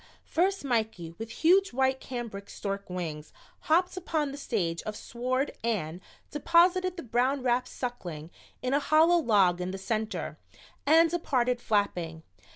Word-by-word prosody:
First 380 -1 0
Mikey, 220 -9 -1
with 225 0 -5
huge 370 +5 +3
white 265 +1 +2
cambric 230 -7 -6
stork 200 -1 -5
wings, 160 -4 -5 0.3
hopped 355 +4 +2
upon 315 -5 -1
the - - -6
stage 175 - -1
of 215 - -5
sward 255 +5 -2
and 185 -7 -2 0.3
deposited 355 +4 +3
the 335 - -5
brown 250 +3 +1
wrapped 250 0 +1
Suckling 175 - -6 0.3
in 255 +1 0
a 285 - +4
hollow 315 +4 +5
log 195 - +3
in 180 - -2
the 190 - -4
center, 215 +2 -3 0.5
and 325 +2 +7
departed 250 -8 0
flapping. 175 -7 -1
245 Hz, 145 wpm, -29 LUFS, 195-300 Hz, 0.5 s, and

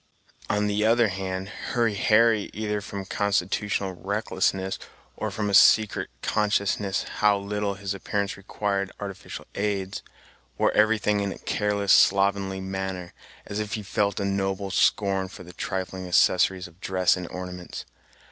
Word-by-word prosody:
On 105 0 +1
the 105 0 +1
other 115 0 +4
hand, 95 0 -4
Hurry 115 0 -1
Harry, 110 +1 +3
either 105 -1 -2
from 100 -1 -6
constitutional 100 0 0
recklessness, 95 0 -1 0.4
or - - -3
from 105 -1 -2
a 100 - -1
secret 110 +2 +5
consciousness 100 -2 +1
how 105 -1 +4
little 100 0 -2
his 100 +1 -4
appearance 100 0 -2
required 100 0 -2
artificial 100 -1 -7
aids, 100 -2 -2 0.6
wore - - +3
everything 105 -1 +3
in 100 -1 -1
a - - -7
careless, 105 -1 +1
slovenly 95 0 +3
manner, 95 -2 -4 0.3
as 100 - -4
if 105 0 -3
he 105 - -5
felt 100 +1 0
a 100 - -1
noble 95 0 -1
scorn 95 0 +2
for 95 - -11
the 90 0 -12
trifling 95 +1 -4
accessories 90 +1 +3
of 85 +2 -21
dress 95 -1 +2
and 90 -2 -5
ornaments. 90 0 -7
100 Hz, 145 wpm, -26 LUFS, 95-105 Hz, 0.6 s, secret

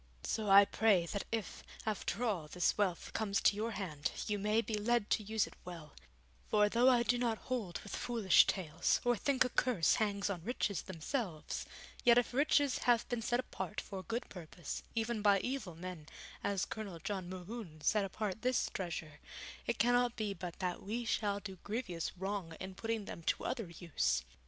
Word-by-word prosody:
So 215 -2 -1
I 200 +1 +9
pray 200 -5 +3
that 200 +4 -3
if, 225 -3 -3 0.2
after 215 +2 -2
all, 190 -10 0
this 180 +3 +1
wealth 190 -5 -1
comes 200 -3 +1
to - - +5
your 220 +2 -1
hand 155 -8 -2 0.2
you 210 -1 -1
may 210 +2 +2
be 230 - -5
led 215 +1 +1
to - - +3
use 215 0 +1
it - - -12
well; 170 -4 -9 0.6
for 210 0 +4
though 240 +4 +5
I 245 -2 +5
do 245 0 +2
not 235 -2 +1
hold 225 -9 -3
with 205 - -6
foolish 230 -6 +4
tales, 170 -3 +1
or 245 0 +4
think 260 +4 +2
a - - -1
curse 235 -10 +3
hangs 200 -2 +1
on 185 -5 -3
riches 210 -4 -1
themselves, 185 - -3 0.4
yet 240 -1 +7
if 245 0 +2
riches 285 0 +3
have 235 -1 +4
been 240 -2 -1
set 240 +2 +1
apart 210 -5 -4
for 195 - -6
a 185 - -12
good 235 +2 -2
purpose, 170 -2 -6
even 225 -1 0
by 200 -1 +5
evil 250 -10 -3
men, 170 -3 -7 0.4
as 200 -2 0
Colonel 205 -6 -6
John 185 +1 -4
Mohune 185 -3 -7
set 210 +6 +3
apart 205 +1 -3
this 255 0 +1
treasure, 160 -4 -4 0.5
it 235 - 0
cannot 245 +1 +3
be 215 -3 -2
but 175 -2 -6
that 180 -2 -2
we 230 +4 -3
shall 205 -3 0
do 195 -2 -8
grievous 195 -6 -3
wrong 190 -3 -3
in 190 0 -6
putting 225 +1 -2
them 170 - -7
to - - 0
other 220 -7 -2
use. 160 - 0
205 Hz, 190 wpm, -35 LUFS, 180-230 Hz, 0.6 s, I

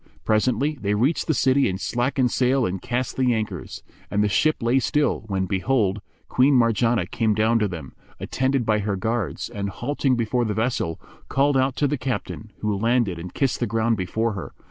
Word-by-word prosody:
Presently 130 +7 +1
they 100 0 0
reached 130 +10 +1
the 160 - +2
city 135 -1 +3
and 95 0 -3
slackened 125 +2 0
sail 130 0 +2
and 95 -2 -3
cast 125 +1 -2
the 125 -2 +2
anchors; 110 -1 -5 0.3
and 105 0 +1
the - - +3
ship 145 +12 +3
lay 120 +3 +3
still, 145 -3 0
when 95 -2 -1
behold, 100 +1 0 0.3
Queen 135 +2 +3
Marjanah 115 -3 +2
came 110 -3 +1
down 110 +2 +3
to 105 - +1
them, 80 -8 -8 0.3
attended 130 -1 0
by 110 -1 +2
her 100 -1 -1
guards 110 +1 -2
and, 100 -1 -4
halting 130 +5 -1
before 120 +1 0
the 105 -3 -2
vessel, 110 -8 -1 0.3
called 140 +1 +2
out 130 0 +2
to 145 - +1
the 145 -1 -2
captain, 120 -4 -4
who 105 -1 0
landed 115 -4 +1
and 90 +1 -8
kissed 135 -3 0
the 120 - 0
ground 115 +1 +1
before 110 +4 -1
her. 95 -3 -7
115 Hz, 190 wpm, -23 LUFS, 105-130 Hz, 0.3 s, city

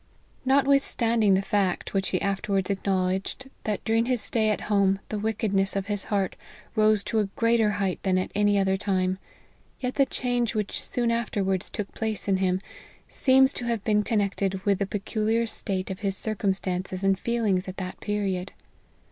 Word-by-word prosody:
10 - - -35
LIFE - - -35
OF - - -35
HENRY - - -34
MARTYN. 265 +1 +4 0.2
Notwithstanding 230 -6 +3
the 190 - +2
fact, 195 -3 0
which 195 -1 0
he 185 - -1
afterwards 195 -1 0
acknowledged, 195 +6 -1
that 210 -2 -2
during 225 +1 +2
his 250 -2 +1
stay 220 0 +1
at 215 - 0
home 200 -2 +2
the 215 - -2
wickedness 205 -3 0
of 195 -1 -1
his 205 -1 -3
heart 200 -3 -1 0.4
rose 215 -2 +4
to 225 - 0
a 210 - +2
greater 230 -2 +3
height 195 -3 -1
than 185 -1 +1
at 185 - -1
any 205 0 +3
other 190 -1 +2
time, 190 -2 0 0.6
yet 255 -1 -2
the 275 -1 +3
change 245 -2 -1
which 210 -2 -2
soon 240 -1 -1
after 230 -3 -1
wards 190 -1 0
took 205 -2 -5
place 220 -2 -3
in 195 -1 +3
him, 185 -1 +1 0.5
seems 265 0 +4
to 245 - -4
have 230 -3 -1
been 210 -1 +3
con 220 +1 0
nected 195 -1 -1
with 200 -2 +2
the 200 - 0
peculiar 215 +3 0
state 195 -4 -2
of 190 - -5
his 195 -2 -2
circumstances 190 -3 -2
and 195 -1 +2
feelings 210 -6 0
at 185 - -7
that 185 -1 -5
period. 195 -3 -2
205 Hz, 195 wpm, -26 LUFS, 190-220 Hz, 0.6 s, MARTYN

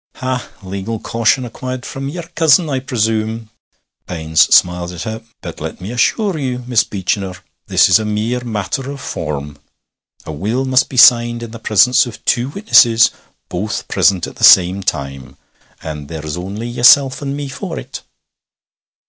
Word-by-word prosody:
'Ha! 130 -1 -4
Legal 100 +4 -5
caution 115 +3 0
acquired 130 +2 -6
from 135 +1 -6
your 175 +4 -6
cousin, 165 +1 +3
I 135 - 0
presume.' 110 -3 -2 0.6
Baines 80 -2 0
smiled 90 0 +3
at 85 - -6
her. 110 0 -5 0.2
'But - - -9
let - - -6
me 95 +5 -7
assure 180 - 0
ye, 130 -3 -2
Miss 125 -3 +1
Beechinor, 95 -1 -3 0.3
this - - +4
is 90 +3 +5
a - - -3
mere 110 +4 -2
matter 115 +4 -4
of 140 0 -7
form. 75 - -6 0.7
A - - -6
will 110 - -2
must 130 -1 +2
be 130 - -7
signed 120 -1 +5
in 115 - -8
the 115 - -9
presence 120 +4 +3
of 120 - -11
two 125 +2 +1
witnesses, 120 - +4 0.4
both 100 +5 -4
present 95 -4 +2
at - - -11
the - - -8
same 95 +2 +6
time; 70 -6 -5 0.5
and 75 -2 -7
there's 75 -1 -6
only 100 +6 -6
yeself 130 +3 +4
and 140 0 -4
me 145 -1 -5
for 130 - -6
it.' - - -8
115 Hz, 165 wpm, -16 LUFS, 95-130 Hz, 0.7 s, same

